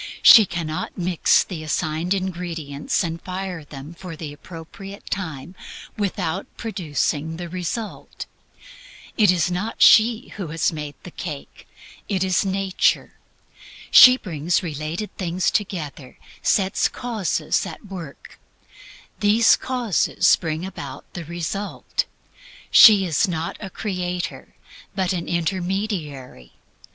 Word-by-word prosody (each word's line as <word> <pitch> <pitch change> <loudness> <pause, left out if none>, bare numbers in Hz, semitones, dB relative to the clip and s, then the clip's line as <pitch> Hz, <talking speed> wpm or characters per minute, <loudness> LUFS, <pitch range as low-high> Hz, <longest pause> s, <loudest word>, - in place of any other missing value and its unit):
She 220 -4 +9
cannot 170 0 -4
mix 180 -2 +3
the 175 -5 -7
assigned 155 +3 -1
ingredients 170 -6 -3
and 165 0 -4
fire 185 -3 -5
them 145 +2 -10
for 180 -1 -9
the 155 -2 -7
appropriate 185 +6 -11
time 160 -4 -4 0.4
without 190 -3 -2
producing 160 - -2
the 175 0 -6
result. 185 +5 -5 0.9
It 210 -2 +4
is 175 -1 +2
not 190 +6 0
she 230 +2 +6
who 190 -4 -4
has 160 +1 0
made 150 -2 -6
the 180 - -10
cake; 150 -5 -8 0.4
it 190 -3 0
is 185 -1 +2
nature. 195 -1 0 0.7
She 255 0 +10
brings 170 - -1
related 160 +5 -5
things 180 -1 0
together; 155 -10 -4 0.2
sets 190 -1 +2
causes 225 -9 -1
at - - -10
work; 175 -8 -10 0.8
these 215 +2 +5
causes 235 -7 +2
bring 160 0 -4
about 140 -7 -8
the 175 - -6
result. 175 +5 -3 0.7
She 205 -4 +8
is 170 +3 +1
not 165 -2 -3
a 195 - -7
creator, 180 -3 -4 0.4
but 190 -2 0
an 170 -2 -4
intermediary. 170 - -3
180 Hz, 115 wpm, -22 LUFS, 160-195 Hz, 0.9 s, She